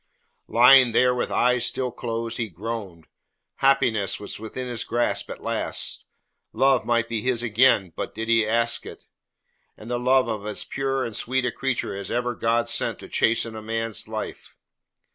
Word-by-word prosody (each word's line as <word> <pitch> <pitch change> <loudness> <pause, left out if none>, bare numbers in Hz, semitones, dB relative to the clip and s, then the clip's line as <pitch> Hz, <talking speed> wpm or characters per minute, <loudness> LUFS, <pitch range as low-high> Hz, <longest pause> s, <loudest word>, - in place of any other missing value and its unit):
Lying 125 0 +7
there 125 +1 +4
with 125 - -2
eyes 125 0 +2
still 125 0 -1
closed 115 -1 -4
he 115 -2 -1
groaned. 100 -3 -6 0.5
Happiness 130 -7 +2
was 105 - -6
within 120 +4 -6
his 120 -2 -3
grasp 120 +1 -1
at - - -8
last. - - -3 0.5
Love 135 +2 +3
might 115 -1 +2
be 115 -2 -2
his 120 0 -1
again 110 -6 +3 0.2
did 115 0 -4
he 115 -1 +4
but - - -4
ask 115 0 +1
it, - - -11 0.7
and 110 +3 -9
the 120 - 0
love 130 0 +3
of 110 -3 -3
as 105 - -3
pure 135 -1 -2
and 115 - -6
sweet 130 +1 -1
a 125 - 0
creature 130 -5 -2
as 100 -1 -6
ever 125 0 -1
God 115 0 0
sent - - -1
to - - -11
chasten 115 0 +1
a 110 - -6
man's 115 -1 -3
life. - - -6
115 Hz, 175 wpm, -24 LUFS, 110-125 Hz, 0.7 s, Lying